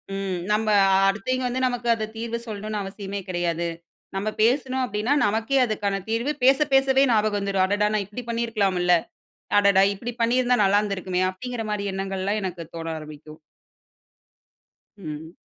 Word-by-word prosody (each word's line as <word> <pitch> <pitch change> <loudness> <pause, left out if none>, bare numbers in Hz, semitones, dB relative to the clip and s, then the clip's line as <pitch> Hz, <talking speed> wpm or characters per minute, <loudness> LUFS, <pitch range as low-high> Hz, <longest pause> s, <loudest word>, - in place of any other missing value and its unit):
ம். 195 -2 -3
நம்ப 215 +1 +1 0.4
அடுத்தவைங்க 250 +6 -1
வந்து 250 +1 -2
நமக்கு 245 -1 -3
அது 220 -1 -3
தீர்வு 230 +1 -3
சொல்லணும்ன்னு 215 0 -4
அவசியமே 195 0 -6
கிடையாது. 170 -1 -1 0.5
நம்ம 200 +3 -1
பேசணும் 260 +3 +2
அப்படீன்னா, 220 +4 -1
நமக்கே 220 +6 +1
அதுக்கான 205 -3 -1
தீர்வு 235 +6 0
பேசப் 275 +3 +4
பேசவே 270 0 +4
ஞாபகம் 215 -2 +2
வந்துரும். 195 -1 0
"அடடா! 205 +2 +1
நா - - +2
இப்படி 210 +6 -8
பண்ணி 235 0 0
இருக்கலாமுல்ல, 190 -5 +1 0.7
அடடா! 200 -1 +5
இப்படி 235 +5 -6
பண்ணீருந்தா 250 +2 +3
நல்லா 200 +1 +4
இருந்திருக்குமே!" 185 -3 -2
அப்படீங்கிற 235 +4 -6
மாரி 205 -1 -2
எண்ணங்கள்லாம் 195 +2 -2
எனக்குத் 175 -3 -6
தோண 165 0 -5
ஆரம்பிக்கும். 155 0 -11 1.6
ம். 160 -3 -8
205 Hz, 145 wpm, -24 LUFS, 190-235 Hz, 1.6 s, அடடா